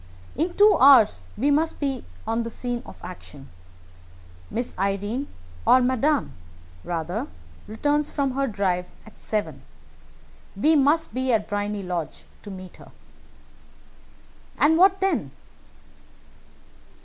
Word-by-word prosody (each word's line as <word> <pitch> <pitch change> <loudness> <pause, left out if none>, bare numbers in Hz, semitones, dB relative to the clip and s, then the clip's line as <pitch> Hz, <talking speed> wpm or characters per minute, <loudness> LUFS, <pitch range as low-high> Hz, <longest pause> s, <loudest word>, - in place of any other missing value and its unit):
In 345 +3 -1
two 415 +1 +6
hours 220 - +6
we 275 +7 +2
must 315 +3 +1
be 275 -2 -2 0.2
on 225 +1 -1
the 230 - -4
scene 245 +1 -4
of - - -12
action. 145 -6 -10 1.0
Miss 240 +2 -3
Irene, 205 +7 -1 0.4
or 255 - +6
Madame, 260 +2 +1 0.5
rather, 170 0 -3 0.4
returns 290 +7 0
from 275 -2 -1
her 275 +1 -1
drive 185 -5 -1 0.2
at 220 - -17
seven. 160 -11 -3 0.9
We 305 +11 +3
must 300 +3 +2
be 260 0 0
at 220 -3 +1
Briony 205 0 -3
Lodge 175 -3 -5 0.2
to - - -10
meet 185 -2 -10
her." - - -15 1.7
"And 310 +2 +4
what 380 +3 +4
then?" 385 0 0
240 Hz, 120 wpm, -24 LUFS, 200-290 Hz, 1.7 s, two